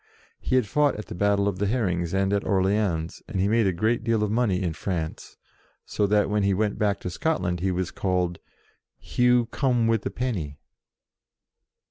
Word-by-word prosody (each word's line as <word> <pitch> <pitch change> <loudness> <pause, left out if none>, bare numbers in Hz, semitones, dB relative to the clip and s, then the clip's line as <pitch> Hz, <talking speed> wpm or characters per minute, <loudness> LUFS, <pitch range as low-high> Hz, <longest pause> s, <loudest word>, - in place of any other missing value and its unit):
He - - -1
had 130 -3 +3
fought 145 +6 +2
at 105 - -6
the - - -8
Battle 100 +2 +1
of 95 -2 -2
the 100 - +1
Herrings 90 -7 0
and 95 +1 +1
at 100 - +1
Orleans, 95 -4 0
and 95 - -3
he 95 - +2
made 110 0 +3
a - - +3
good 110 +6 0
deal 115 -2 +1
of 105 - -1
money 105 -5 +1
in 85 -3 -1
France, 80 -2 -5 0.5
so 105 - 0
that, 105 +1 +3
when 105 0 0
he 100 -1 +2
went 105 +1 -1
back 105 -2 +1
to - - -4
Scotland, 90 - -1
he 95 +2 0
was 90 -1 -2
called 90 -2 -1 0.6
"Hugh 125 -1 +2
come 125 -5 +1
wi' 115 0 +3
the 100 - -4
Penny." 90 - -3
100 Hz, 190 wpm, -25 LUFS, 90-115 Hz, 0.6 s, had